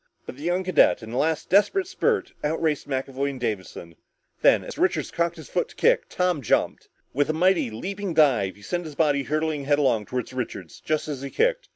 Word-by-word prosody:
But - - -8
the 140 - -13
young 175 +3 0
cadet, 180 -8 +3
in 110 - -8
a 120 - -3
last 160 0 0
desperate 210 - +3
spurt, 415 +2 -1
outraced 155 -1 -1
both 130 -1 -1
McAvoy 135 +1 -2
and 135 -2 -7
Davison. 95 -7 -5 0.5
Then, - - +5
as - - -8
Richards - - +1
cocked 170 0 0
his 160 - -11
foot - - -1
to - - -16
kick, - - +2
Tom 180 -4 0
jumped. 115 - 0 0.2
With 145 +2 +1
a - - +2
mighty 180 -3 +2
leaping 190 - -5
dive, 125 -11 +3
he 100 - -18
sent 175 - -3
his 155 -2 -8
body 145 -3 +2
hurtling 155 0 -2
headlong 140 -7 +2
toward 125 0 -4
Richards 110 -9 -6
just 155 0 -1
as 145 -4 -4
he 140 - -5
kicked. - - 0
150 Hz, 210 wpm, -25 LUFS, 130-180 Hz, 0.5 s, Then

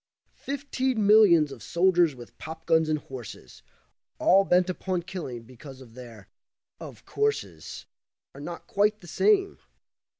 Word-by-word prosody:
Fifteen 265 -5 -1
millions 195 -8 +6
of 130 -4 -10
soldiers 175 - +2
with 120 -2 -13
popguns 160 0 0
and 155 - +1
horses 105 - -11 0.6
All 195 +2 +4
bent 180 0 +3
upon 185 -1 -3
killing, 170 -11 -7
because 130 +3 -13 0.2
their 115 -5 -12 0.5
"of - - -11
courses" 430 0 -3 0.5
Are 140 - -11
not 170 +3 -8
quite 210 +1 +1
the 175 - -13
same. 395 - +2
170 Hz, 125 wpm, -26 LUFS, 135-205 Hz, 0.6 s, millions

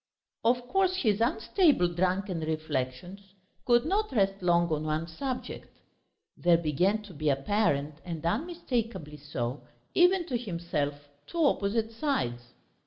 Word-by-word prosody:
Of 245 +1 +2
course 375 +3 +2
his 225 - +1
unstable 280 - +3
drunken 185 +1 0
reflections 155 +2 -3 0.5
could 240 +1 +4
not 415 +6 0
rest 195 -4 +1
long 175 -1 +3
on 155 -1 0
one 155 +1 -1
subject; 255 +10 -5 0.6
there 175 -1 +4
began 180 +7 +1
to 200 -3 -12
be 155 0 -1
apparent 145 -1 +1
and 165 -3 -6
unmistakably 230 - -2
so, 135 -3 -4 0.3
even 360 0 +4
to 250 -8 -2
himself, 160 -8 -3 0.2
two 335 -2 +1
opposite 220 -2 +1
sides. 225 - -1
190 Hz, 125 wpm, -29 LUFS, 155-245 Hz, 0.6 s, could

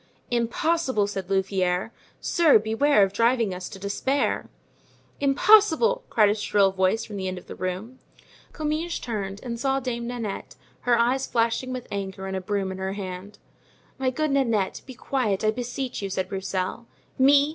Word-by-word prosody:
"Impossible!" 245 +1 +1
said 195 -2 -5
Louvieres; 190 0 0 0.3
"sir, 330 -7 +5
beware 220 +2 +3
of 195 0 0
driving 230 -2 +2
us 180 0 -6
to 195 - -9
despair." 205 +8 -1 0.7
"Impossible!" 425 - +5
cried 215 -2 +4
a - - +3
shrill 205 -2 +2
voice 190 +4 +1
from 210 - -7
the 190 -1 -3
end 185 0 -3
of 180 - -10
the - - -8
room. 195 +8 -5 0.5
Comminges 310 +2 -2
turned 200 -4 -4
and 235 -2 -4
saw 270 +2 +1
Dame 235 -2 -3
Nanette, 230 -5 -5 0.2
her 240 -1 +2
eyes 250 +3 +2
flashing 235 +2 0
with 255 -1 -5
anger 195 -1 -4
and 190 0 -3
a 190 - -2
broom 195 0 -2
in 190 - -6
her 190 0 -2
hand. 195 +1 -7 0.6
"My 265 -1 +1
good 305 +3 -1
Nanette, 230 -8 +1
be 260 - -9
quiet, 235 -7 -1
I 215 - +4
beseech 245 +2 -4
you," 195 - -3
said 185 -1 -2
Broussel. 190 +3 -3 0.3
"Me! 280 +2 +6
225 Hz, 170 wpm, -25 LUFS, 195-260 Hz, 0.7 s, Me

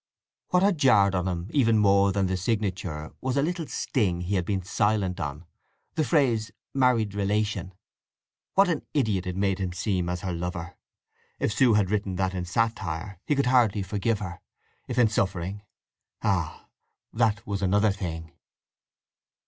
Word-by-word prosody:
What 180 +1 +2
had 195 -5 +2
jarred 105 -8 +5
on 90 0 0
him 90 -1 -3
even 115 -6 +4
more 100 -1 +4
than 95 0 +1
the 95 0 0
signature 95 -6 -2
was 130 +1 -1
a 140 - +3
little 170 -1 -2
sting 95 -9 -1
he 90 +3 -3
had 90 -3 +1
been 95 -1 -1
silent 100 -1 0
on—the 80 - -6
phrase 120 -9 +2 0.2
"married 125 -6 +2
relation"—What 105 - -2
an 165 -4 -1
idiot 105 -9 +1
it 90 - -3
made 95 0 0
him 95 -2 -2
seem 90 -1 -1
as 90 0 -3
her 95 -3 -3
lover! 85 0 -4 0.6
If 105 - 0
Sue 120 -2 +4
had 100 -2 +2
written 100 -3 -1
that 95 0 0
in 90 -1 -3
satire, 100 -3 -2
he 150 - +2
could 140 -1 +1
hardly 120 -6 +3
forgive 105 +3 0
her; 90 -4 -7 0.5
if 125 - -4
in 120 -2 +6
suffering—ah, 100 -1 -3 0.5
that 110 -2 +1
was 100 -1 -3
another 105 +2 +3
thing! 80 -5 -5
100 Hz, 155 wpm, -26 LUFS, 90-115 Hz, 0.6 s, in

